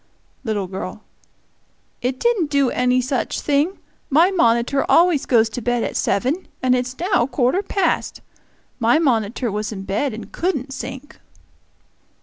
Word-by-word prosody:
Little 215 Hz, -5 st, -1 dB
girl. 190 Hz, +3 st, -7 dB, 1.0 s
"It 255 Hz, +1 st, -2 dB
didn't 445 Hz, -10 st, +1 dB
do 280 Hz, -3 st, +2 dB
any 250 Hz, 0 st, +2 dB
such 255 Hz, 0 st, -2 dB
thing. 295 Hz, +6 st, +1 dB, 0.3 s
My 330 Hz, +7 st, +4 dB
monitor 235 Hz, -4 st, +2 dB
always 340 Hz, -4 st, +4 dB
goes 230 Hz, -3 st, +4 dB
to 245 Hz, -, -5 dB
bed 245 Hz, 0 st, 0 dB
at -, -, -3 dB
seven, 270 Hz, -, 0 dB
and 255 Hz, -1 st, +2 dB
it's 250 Hz, 0 st, -1 dB
now 350 Hz, -, +1 dB
quarter 270 Hz, +6 st, +1 dB
past. 395 Hz, 0 st, -1 dB, 0.6 s
My 235 Hz, +2 st, +4 dB
monitor 235 Hz, -5 st, 0 dB
was 210 Hz, +1 st, -3 dB
in 195 Hz, -3 st, -6 dB
bed 215 Hz, +6 st, -1 dB
and 225 Hz, -, -9 dB
couldn't 285 Hz, -7 st, -2 dB
sink!" 265 Hz, +3 st, -8 dB
255 Hz, 140 wpm, -21 LUFS, 230-295 Hz, 1.0 s, My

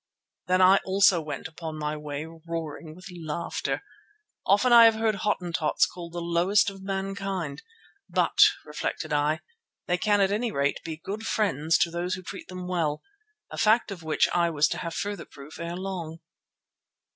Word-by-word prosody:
Then 185 Hz, +1 st, +4 dB
I 190 Hz, +2 st, +7 dB
also 190 Hz, -2 st, +4 dB
went 150 Hz, -3 st, -5 dB
upon 160 Hz, -1 st, -7 dB
my 150 Hz, 0 st, -2 dB
way 150 Hz, 0 st, -5 dB
roaring 165 Hz, -1 st, -7 dB
with 185 Hz, -, -14 dB
laughter. 165 Hz, 0 st, -3 dB, 0.6 s
Often 225 Hz, +6 st, +4 dB
I 235 Hz, -1 st, +10 dB
have 225 Hz, -1 st, +6 dB
heard 220 Hz, 0 st, +1 dB
Hottentots 180 Hz, -5 st, +1 dB
called 170 Hz, -1 st, -9 dB
the 175 Hz, -, -4 dB
lowest 180 Hz, +5 st, +2 dB
of 195 Hz, -1 st, -12 dB
mankind, 195 Hz, -5 st, -3 dB, 0.5 s
but, -, -, 0 dB, 0.3 s
reflected 155 Hz, -2 st, -4 dB
I, 150 Hz, +2 st, +1 dB, 0.4 s
they 180 Hz, 0 st, 0 dB
can 205 Hz, -1 st, +2 dB
at 195 Hz, 0 st, +3 dB
any 225 Hz, +3 st, 0 dB
rate 140 Hz, -5 st, 0 dB
be 160 Hz, -1 st, -5 dB
good 210 Hz, +6 st, -6 dB
friends 165 Hz, -7 st, +1 dB
to 170 Hz, -, +2 dB
those 175 Hz, +3 st, -2 dB
who 185 Hz, -, -9 dB
treat 190 Hz, +1 st, -8 dB
them 180 Hz, -1 st, -7 dB
well—a 400 Hz, -, -5 dB
fact 220 Hz, 0 st, +3 dB
of 185 Hz, -4 st, -7 dB
which 160 Hz, -1 st, +2 dB
I 175 Hz, -1 st, +3 dB
was 150 Hz, -2 st, +3 dB
to 170 Hz, -, -3 dB
have 170 Hz, -2 st, -5 dB
further 205 Hz, 0 st, -3 dB
proof 140 Hz, +2 st, -12 dB
ere 170 Hz, +1 st, -4 dB
long. 180 Hz, -4 st, -5 dB
175 Hz, 170 wpm, -27 LUFS, 160-195 Hz, 0.6 s, I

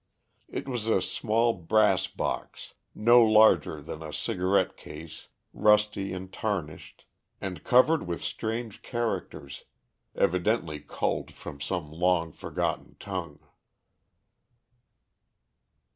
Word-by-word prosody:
It -, -, -5 dB
was 120 Hz, -4 st, -3 dB
a 110 Hz, -, +3 dB
small 115 Hz, +5 st, +1 dB
brass 95 Hz, +2 st, +2 dB
box -, -, -5 dB, 0.2 s
no 120 Hz, +3 st, +6 dB
larger 110 Hz, -9 st, +4 dB
than 80 Hz, +1 st, -7 dB
a 80 Hz, -1 st, -7 dB
cigarette 95 Hz, +5 st, 0 dB
case, 80 Hz, +1 st, -11 dB, 0.3 s
rusty 105 Hz, -2 st, +3 dB
and 95 Hz, 0 st, -7 dB
tarnished, 90 Hz, -8 st, -4 dB, 0.3 s
and 90 Hz, -5 st, -6 dB
covered 135 Hz, -, +4 dB
with 85 Hz, -3 st, -4 dB
strange 115 Hz, -1 st, -4 dB
characters, 115 Hz, -, -4 dB, 0.5 s
evidently 90 Hz, -3 st, +1 dB
culled -, -, -2 dB
from 70 Hz, -1 st, -10 dB
some 75 Hz, -1 st, -3 dB
long 85 Hz, 0 st, +1 dB
forgotten -, -, -3 dB
tongue. 95 Hz, -3 st, -6 dB
95 Hz, 100 wpm, -28 LUFS, 80-110 Hz, 0.5 s, no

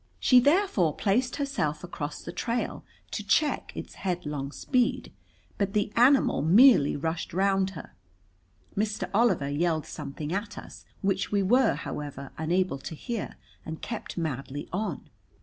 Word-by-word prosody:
She 255 Hz, -, +6 dB
therefore 285 Hz, -, +3 dB
placed 245 Hz, +5 st, +1 dB
herself 160 Hz, -, -2 dB
across 150 Hz, -4 st, -5 dB
the -, -, -6 dB
trail 235 Hz, 0 st, -2 dB, 0.3 s
to -, -, -3 dB
check 305 Hz, -, +1 dB
its -, -, -7 dB
headlong 150 Hz, -7 st, -3 dB
speed, 250 Hz, -, 0 dB, 0.5 s
but 200 Hz, -1 st, 0 dB
the 210 Hz, 0 st, 0 dB
animal 255 Hz, -, +5 dB
merely 190 Hz, -, +6 dB
rushed 160 Hz, +4 st, -3 dB
round 195 Hz, 0 st, +2 dB
her. -, -, -10 dB, 0.8 s
Mr. 205 Hz, -3 st, -1 dB
Oliver 205 Hz, -10 st, +3 dB
yelled 160 Hz, +1 st, 0 dB
something 150 Hz, +2 st, -6 dB
at 205 Hz, +2 st, -3 dB
us, -, -, -10 dB, 0.2 s
which 195 Hz, -1 st, 0 dB
we 200 Hz, -1 st, +2 dB
were, 250 Hz, +7 st, +4 dB
however, 140 Hz, -2 st, -6 dB
unable 170 Hz, -2 st, 0 dB
to 160 Hz, -, -7 dB
hear, 235 Hz, +6 st, -5 dB, 0.3 s
and 160 Hz, 0 st, -7 dB
kept 225 Hz, -5 st, -5 dB
madly 145 Hz, -3 st, -4 dB
on. 195 Hz, -5 st, -3 dB
190 Hz, 140 wpm, -28 LUFS, 150-230 Hz, 0.8 s, She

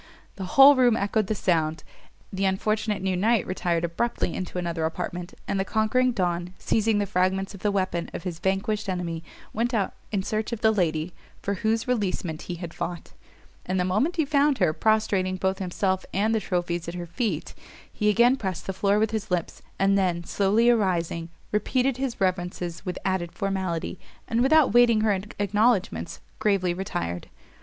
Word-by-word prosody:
the 190 Hz, -, -5 dB
whole 275 Hz, +1 st, +10 dB
room 245 Hz, -3 st, +4 dB
echoed 205 Hz, 0 st, 0 dB
the 215 Hz, -, -1 dB
sound; 160 Hz, -4 st, 0 dB, 0.5 s
the 190 Hz, +1 st, -2 dB
unfortunate 205 Hz, +1 st, 0 dB
new 190 Hz, -1 st, 0 dB
knight 220 Hz, +4 st, +2 dB
retired 175 Hz, -2 st, -1 dB
abruptly 170 Hz, +2 st, -1 dB
into 185 Hz, -1 st, -5 dB
another 170 Hz, -2 st, -2 dB
apartment, 175 Hz, +2 st, -4 dB
and 195 Hz, -, -1 dB
the -, -, +2 dB
conquering 220 Hz, +5 st, +2 dB
Don, 180 Hz, -3 st, -2 dB
seizing 220 Hz, -1 st, +1 dB
the 205 Hz, -, +1 dB
fragments 190 Hz, 0 st, 0 dB
of 195 Hz, -, -10 dB
the 210 Hz, -, 0 dB
weapon 185 Hz, -3 st, -1 dB
of -, -, -6 dB
his 175 Hz, -3 st, -5 dB
vanquished 200 Hz, +3 st, -1 dB
enemy 170 Hz, -3 st, -3 dB, 0.3 s
went 235 Hz, +3 st, 0 dB
out 200 Hz, -3 st, 0 dB, 0.2 s
in 200 Hz, -3 st, 0 dB
search 215 Hz, +3 st, -2 dB
of 235 Hz, -2 st, -4 dB
the 220 Hz, -1 st, +5 dB
lady 170 Hz, -4 st, 0 dB, 0.3 s
for 200 Hz, -, 0 dB
whose 220 Hz, +3 st, 0 dB
releasement 190 Hz, -9 st, -1 dB
he 175 Hz, -, -2 dB
had 170 Hz, -1 st, -7 dB
fought: 175 Hz, -1 st, -5 dB, 0.5 s
and 185 Hz, 0 st, -1 dB
the 180 Hz, -, +1 dB
moment 215 Hz, -, +1 dB
he 320 Hz, -3 st, +1 dB
found 285 Hz, -1 st, +3 dB
her, 155 Hz, -, +2 dB
prostrating 200 Hz, -2 st, +1 dB
both 190 Hz, +1 st, -1 dB
himself 190 Hz, 0 st, -1 dB
and 215 Hz, +3 st, +2 dB
the 220 Hz, -, +2 dB
trophies 175 Hz, -4 st, -2 dB
at 170 Hz, -, -5 dB
her 175 Hz, -1 st, -4 dB
feet, 170 Hz, -, -3 dB, 0.4 s
he 210 Hz, -1 st, +1 dB
again 235 Hz, +4 st, +5 dB
pressed 190 Hz, -7 st, -4 dB
the 190 Hz, -, -3 dB
floor 200 Hz, +2 st, +2 dB
with 220 Hz, +1 st, +1 dB
his 220 Hz, -1 st, -3 dB
lips, 180 Hz, -2 st, -2 dB, 0.2 s
and 195 Hz, 0 st, +3 dB
then, 175 Hz, -3 st, 0 dB
slowly 205 Hz, +6 st, +2 dB
arising, 175 Hz, -7 st, +1 dB, 0.2 s
repeated 250 Hz, +5 st, +1 dB
his 265 Hz, -2 st, -3 dB
reverences 175 Hz, -2 st, -2 dB
with 180 Hz, -2 st, -4 dB
added 185 Hz, -3 st, -1 dB
formality, 190 Hz, -3 st, -3 dB, 0.3 s
and, 230 Hz, 0 st, +1 dB
without 285 Hz, -2 st, +5 dB
waiting 240 Hz, -2 st, +5 dB
her 215 Hz, -1 st, +3 dB, 0.2 s
acknowledgments, 200 Hz, -, +1 dB, 0.2 s
gravely 195 Hz, -4 st, +2 dB
retired. 90 Hz, -, -4 dB
195 Hz, 180 wpm, -26 LUFS, 175-220 Hz, 0.5 s, whole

